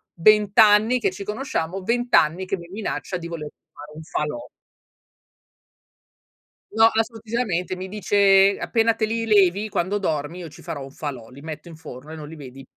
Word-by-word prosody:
20 210 +3 +4
anni 220 +3 +6
che 195 -4 0
ci 200 +2 -7
conosciamo, 195 -5 -3
20 240 +3 -1
anni 170 +5 +3
che 195 0 -1
mi 170 0 -11
minaccia 200 -2 -4
di 170 - -7
voler 160 -3 -6 0.2
fare 150 +1 -12
un 160 - -8
falò. 150 -5 -4 2.2
No, 225 +1 +5
assolutissimamente. 220 -5 -2
Mi 185 +1 -6
dice: 200 0 +4
"Appena 230 0 +2
te 220 - 0
li 225 +1 -2
levi, 205 0 +3
quando 190 +2 -1
dormi 160 -2 -2
io 170 -3 -7
ci - - -15
farò 145 - -6
un 135 - -10
falò, 140 -7 -7
li 135 +2 -13
metto 155 +1 -8
in 165 - -11
forno 150 -2 -11
e 160 - -7
non 150 -1 -8
li 160 - -10
vedi". 135 -2 -11
185 Hz, 180 wpm, -23 LUFS, 155-215 Hz, 2.2 s, anni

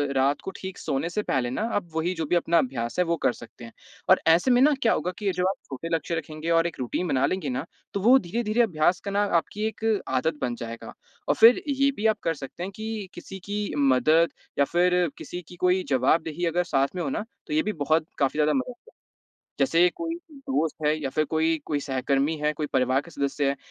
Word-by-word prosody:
रात 135 +2 +2
को 190 - -5
ठीक 190 -1 -7
सोने 135 +5 -2
से 210 +4 -1
पहले 125 -8 0
ना 130 - -3
अब 185 -4 -2
वही 165 +3 0
जो 165 -2 -2
भी 175 - +1
अपना 170 0 +2
अभ्यास 125 -2 -1
है 180 - +4
वो 170 0 +1
कर 125 - +4
सकते 120 0 -12
हैं 115 - -12 0.4
और - - +7
ऐसे 170 +10 +5
में 245 0 +5
ना 295 +3 +6
क्या 230 - +4
होगा 180 - -1
कि 210 - -7
ये 195 - +3
जो 180 - +1
आप 195 - -2
छोटे 140 +5 -6
लक्ष्य 165 +1 -2
रखेंगे 155 0 -5
और 165 0 +3
एक 170 - -8
रूटीन 130 +8 -2
बना 135 -3 +2
लेंगे 170 -1 -2
ना 130 +4 -3 0.3
तो 200 - -1
वो 245 +6 +7
धीरे-धीरे 220 +4 0
अभ्यास 175 -4 +2
करना 200 +1 +1 0.2
आपकी 210 +6 -5
एक 220 0 -7 0.2
आदत 150 +4 0
बन 120 -1 -1
जाएगा। 115 0 -8 0.3
और - - +3
फ़िर 230 +2 +7
ये 275 0 +2
भी 210 - -3
आप 215 -1 +1
कर 165 - +1
सकते 145 +3 -8
हैं 190 - -4
कि 220 -3 -5
किसी 195 - -9
की 205 +1 -1 0.2
मदद 145 +4 +4 0.3
या 140 - +5
फ़िर 180 +2 +2
किसी 180 - -7
की 180 - -12
कोई 180 +1 +3
जवाबदेही 155 +5 +1
अगर 175 +1 +1
साथ 140 -3 0
में 180 - -2
हो 145 - -2
ना 205 - -3 0.2
तो - - -4
ये 155 - +2
भी 215 - -2
बहुत 155 +2 +2
काफ़ी 140 +1 0
ज़्यादा 150 0 +3
मदद 255 -2 -1
करेगा। 455 - -23 0.7
जैसे 175 -7 +4
कोई 330 -1 -3 0.2
दोस्त 270 - -2
है 150 - +4
या 135 -3 -3
फ़िर 155 +3 +1
कोई 160 +1 +1
कोई 145 -2 -1
सहकर्मी 140 +3 0
है, 150 0 0
कोई 150 0 -3
परिवार 130 0 +1
के 155 - -14
सदस्य 140 -1 -1
है, 140 - 0
165 Hz, 235 wpm, -26 LUFS, 140-190 Hz, 0.7 s, और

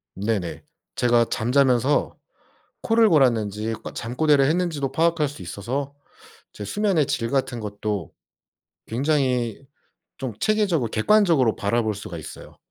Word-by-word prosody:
네네. 100 -3 -3 0.3
제가 120 -1 +3
잠자면서 130 +2 +2 0.7
코를 225 -1 +4
골았는지 115 - +2
꼬 - - -6
잠꼬대를 135 +4 +2
했는지도 155 -4 0
파악할 160 +1 +2
수 140 - -10
있어서 125 +11 -4 0.6
제 105 - -8
수면의 190 - +1
질 115 0 -2
같은 130 -3 -1
것도 105 -5 -4 0.8
굉장히 130 -2 0 0.5
좀 130 -4 -4
체계적으로 190 - +1
객관적으로 155 - +3
바라볼 110 +1 0
수가 90 -4 -7
있어요. 80 - -11
125 Hz, 290 characters per minute, -23 LUFS, 110-150 Hz, 0.8 s, 코를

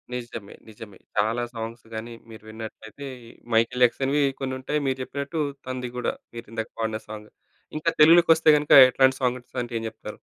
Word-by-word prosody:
నిజమే. 115 -4 -7 0.2
నిజమే. 105 -1 -12 0.2
చాలా 110 +4 +1
సాంగ్స్ 115 0 -7
గాని 115 +2 -6 0.2
మీరు 110 -1 -12
విన్నట్లైతే 110 +4 -9 0.5
'మైకెల్ 115 +3 +2
జాక్సన్‌‌వి' 135 +4 +1 0.2
కొన్ని 130 -1 -3
ఉంటాయి. 150 +3 -2
మీరు 130 - 0
చెప్పినట్టు 140 +4 -5 0.3
తనది 125 -1 -4
కూడా 125 - -1 0.2
మీరు 115 - -7
ఇందాక 110 -1 -4
పాడిన 110 -1 -2
సాంగ్. 105 0 -9 0.5
ఇంకా 160 +2 0
తెలుగులోకొస్తే 165 0 +6
గనక 150 0 -4 0.2
ఎట్లాంటి 130 +1 +3
సాంగ్స్ 125 0 -2
అంటే 120 0 -7
ఏం - - -7
చెప్తారు? - - -10
120 Hz, 155 wpm, -25 LUFS, 110-135 Hz, 0.5 s, తెలుగులోకొస్తే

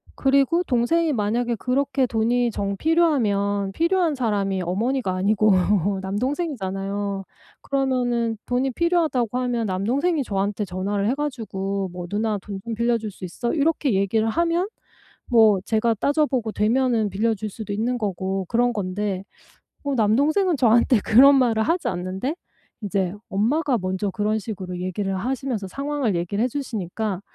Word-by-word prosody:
그리고 275 +5 +3
동생이 315 +5 +1
만약에 235 +2 0
그렇게 265 +3 0
돈이 235 +1 +1
정 200 -1 -3
필요하면 205 - +1
필요한 335 - +2
사람이 200 -6 0
어머니가 215 +4 -1
아니고 210 +3 +3 0.5
남동생이잖아요. 200 - -2 0.4
그러면은 245 -4 0
돈이 255 +2 0
필요하다고 305 -8 +1
하면 245 -3 -1
남동생이 265 - 0
저한테 200 -1 -2
전화를 200 +3 -1
해 260 - +1
가지고 200 -9 -3
뭐 180 -1 -6
"누나 210 0 0
돈 200 -2 -7
좀 230 -1 -4
빌려줄 230 -1 0
수 185 - -9
있어?" 235 +7 -3
이렇게 295 -4 +1
얘기를 215 +3 +1
하면 340 - +1 0.6
뭐 220 -4 +5
제가 225 +1 +2
따져 295 +2 +2
보고 240 -6 -2
되면은 230 -1 +1
빌려 220 +4 +1
줄 215 +1 -5
수도 215 0 -6
있는 240 +4 -1
거고 190 -3 -2
그런 245 +1 +2
건데 195 -1 -3 0.6
뭐 280 -1 -1
남동생은 290 - +2
저한테 235 -1 +4
그런 275 +6 +7
말을 235 -4 +3
하지 335 +8 0
않는데 185 - -3 0.5
이제 195 -3 -1 0.2
엄마가 250 +7 +1
먼저 190 +2 -2
그런 210 +2 0
식으로 190 -4 -6
얘기를 190 +1 -2
하시면서 245 -1 -3
상황을 275 -4 -1
얘기를 190 +6 -1
해 - - +2
주시니까 215 -6 -3
225 Hz, 340 characters per minute, -23 LUFS, 200-265 Hz, 0.6 s, 그런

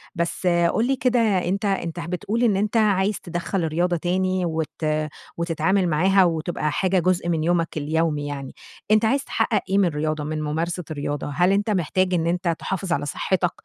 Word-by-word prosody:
بس 170 +2 -2
قل 175 +7 +2
لي 270 - +2
كده، 250 -1 +1
أنتَ 195 -2 +1
أنتَ 175 -4 -1
بتقول 185 +7 -2
إن 215 -5 +3
أنتَ 210 +3 0
عايز 205 -1 +2
تِدخّل 175 +1 -3
الرياضة 175 +3 0
تاني 185 +1 0
وت 160 -1 -3 0.5
وتتعامل 170 +3 +1
معاها 190 +5 +4
وتبقى 160 -2 -1
حاجة 185 +3 +1
جزء 175 0 +1
من 160 -2 0
يومَك 170 -1 0
اليومي 150 0 0
يعني. 140 -2 -6 0.4
أنتَ 215 +1 +5
عايز 275 +4 +2
تحقق 215 -5 0
إيه 195 - +2
من 200 - +4
الرياضة، 155 -1 -1
من 155 +1 -3
ممارسة 165 +4 -2
الرياضة؟ 145 -1 -3
هل 180 +2 +3
أنتَ 205 +2 +1
محتاج 185 0 +1
إن 165 -1 +1
أنتَ 170 -1 0
تحافظ 190 -2 -3
على 145 -1 -1
صحتك 180 +4 0
175 Hz, 175 wpm, -23 LUFS, 160-195 Hz, 0.5 s, أنتَ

